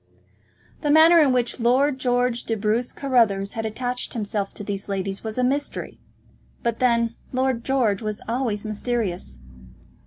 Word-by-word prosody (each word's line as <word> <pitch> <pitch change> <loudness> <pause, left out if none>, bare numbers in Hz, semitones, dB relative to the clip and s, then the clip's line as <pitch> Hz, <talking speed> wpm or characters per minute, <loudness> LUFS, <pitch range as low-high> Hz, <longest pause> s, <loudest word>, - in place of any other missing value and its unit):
The 295 - -1
manner 320 +3 +7
in 285 -3 +4
which 250 0 0
Lord 260 +4 +2
George 245 -1 +1
de 225 - -1
Bruce 220 +3 0
Carruthers 225 -8 +1
had 225 -1 -2
attached 245 +3 -4
himself 205 -2 -2
to - - -7
these 200 0 -4
ladies 195 0 -3
was 220 0 -4
a 250 - +1
mystery; 280 +3 -2 0.6
but 235 -1 -1
then 235 -2 +2 0.2
Lord 255 -2 0
George 240 -7 +1
was 215 -1 -3
always 230 -3 -1
mysterious. 215 - -3
235 Hz, 150 wpm, -23 LUFS, 210-255 Hz, 0.6 s, manner